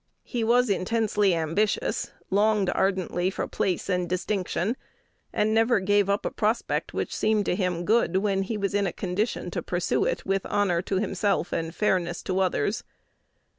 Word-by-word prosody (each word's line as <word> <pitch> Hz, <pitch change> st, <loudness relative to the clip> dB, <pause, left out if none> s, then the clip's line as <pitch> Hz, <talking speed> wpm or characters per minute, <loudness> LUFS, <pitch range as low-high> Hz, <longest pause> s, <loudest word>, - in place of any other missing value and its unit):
He 240 Hz, -3 st, -3 dB
was 245 Hz, +2 st, +4 dB
intensely 205 Hz, -1 st, +1 dB
ambitious, 165 Hz, +6 st, 0 dB, 0.2 s
longed 205 Hz, -1 st, +3 dB
ardently 185 Hz, -2 st, 0 dB
for -, -, -3 dB
place 185 Hz, -3 st, -1 dB
and 180 Hz, -2 st, 0 dB
distinction, 185 Hz, +3 st, -1 dB, 0.6 s
and 215 Hz, +1 st, +1 dB
never 225 Hz, 0 st, +4 dB
gave 200 Hz, +1 st, +2 dB
up 200 Hz, +1 st, 0 dB
a -, -, -1 dB
prospect 220 Hz, +2 st, -1 dB
which -, -, -3 dB
seemed 215 Hz, -1 st, +1 dB
to -, -, +1 dB
him 180 Hz, -2 st, -1 dB
good 205 Hz, -4 st, +3 dB
when 195 Hz, -1 st, +1 dB
he 210 Hz, +3 st, -3 dB
was 200 Hz, -1 st, -1 dB
in 200 Hz, -1 st, +2 dB
a -, -, -3 dB
condition 200 Hz, +4 st, -2 dB
to -, -, -2 dB
pursue -, -, 0 dB
it -, -, -2 dB
with 195 Hz, 0 st, 0 dB
honor 185 Hz, -4 st, +1 dB
to 195 Hz, -, -3 dB
himself 195 Hz, -2 st, 0 dB
and 165 Hz, +1 st, -3 dB
fairness 180 Hz, -4 st, 0 dB
to 185 Hz, 0 st, -1 dB
others. 190 Hz, +3 st, 0 dB
195 Hz, 170 wpm, -26 LUFS, 185-215 Hz, 0.6 s, was